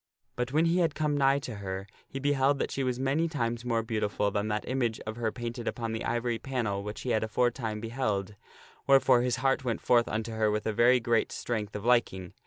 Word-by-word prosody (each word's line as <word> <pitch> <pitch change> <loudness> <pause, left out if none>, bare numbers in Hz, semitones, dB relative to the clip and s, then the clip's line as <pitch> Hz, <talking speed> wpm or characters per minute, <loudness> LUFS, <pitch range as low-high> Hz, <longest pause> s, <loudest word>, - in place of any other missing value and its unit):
But 125 0 -2
when 155 +4 +3
he 170 +2 +2
had 165 -4 +1
come 150 -1 0
nigh 135 -1 +4
to 125 -5 -6
her 95 -1 -5 0.2
he - - -7
beheld 140 0 +2
that - - -2
she 135 - -2
was 125 -1 -1
many 140 +5 +1
times 120 -7 -2
more 115 -2 0
beautiful 105 -2 -1
than 105 +1 -1
that 105 0 -2
image 120 -4 -1
of 110 0 -6
her 115 -2 -1
painted 120 0 -5
upon 115 -2 -2
the 115 - -3
ivory 120 0 -1
panel 115 -7 -2
which 105 +1 -6
he 125 - -2
had 110 - +1
aforetime 115 0 -1
beheld, 110 -4 -2 0.5
wherefore 135 -2 +5
his 125 -1 +1
heart 135 +1 +1
went 120 -3 -1
forth 120 -1 +3
unto 110 +1 -3
her 110 -1 +1
with 105 0 -1
a 110 - 0
very 120 +4 +5
great 115 -1 +1
strength 105 -3 -3
of 105 +1 -5
liking. 105 -7 +1
120 Hz, 220 wpm, -29 LUFS, 110-130 Hz, 0.5 s, wherefore